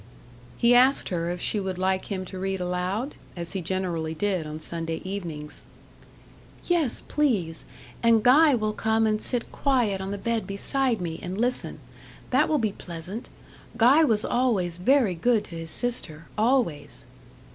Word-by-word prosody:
He 235 0 +4
asked 255 +3 +5
her 170 -2 -1
if 175 0 -3
she 210 - 0
would 190 -2 -3
like 190 0 0
him 190 -2 -4
to 185 0 -8
read 190 0 -2
aloud? 180 +8 -2 0.2
as 170 -1 -5
he 190 - -3
generally 170 -3 -2
did 185 -2 -1
on 155 +1 -6
Sunday 165 0 -4
evenings. 170 -6 -6 1.0
"Yes, 330 -8 +1
please; 200 - 0 0.4
and 230 -2 +4
Guy 290 +3 +6
will 215 -2 -1
come 220 +1 +1
and 215 0 +1
sit 245 -2 -2
quiet 240 -9 +1
on 190 - -4
the 200 - -3
bed 230 +2 -2
beside 235 +3 0
me 165 -2 -4
and 185 +3 -5
listen. 245 +2 0 0.5
That - - +3
will 310 - +3
be 220 -6 0
pleasant. 180 +5 -8 0.5
Guy 260 +7 +6
was 220 -7 +2
always 200 -9 +1
very 235 +1 +3
good 220 +6 +2
to 170 - -9
his 165 0 -6
sister 165 -11 -3
always." 155 - 0
195 Hz, 160 wpm, -26 LUFS, 175-240 Hz, 1.0 s, Guy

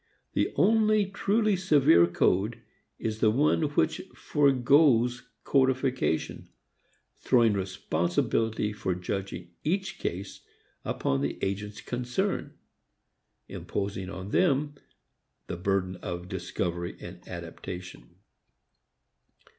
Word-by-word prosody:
The - - +1
only 215 -1 +4
truly 205 +2 +1
severe 145 - +5
code 95 +5 +1 0.4
is 110 -1 -3
the 110 - +4
one 145 +9 +2
which - - +1
foregoes 130 -3 +3 0.2
codification, 130 - 0 0.7
throwing 115 -3 +4
responsibility 95 +3 -1
for 95 -3 -2
judging 95 0 -5
each 190 +4 -1
case 95 +3 -5 0.4
upon 70 0 -1
the 70 - -2
agents 105 +2 -3
concerned, 125 +11 -2 0.9
imposing 100 -2 -4
upon 95 0 -7
them 145 -3 +2 0.7
the - - -5
burden 95 0 -1
of 90 0 -6
discovery 85 -1 -3
and 90 0 -10
adaptation. 85 -6 -8
105 Hz, 90 wpm, -28 LUFS, 90-140 Hz, 0.9 s, severe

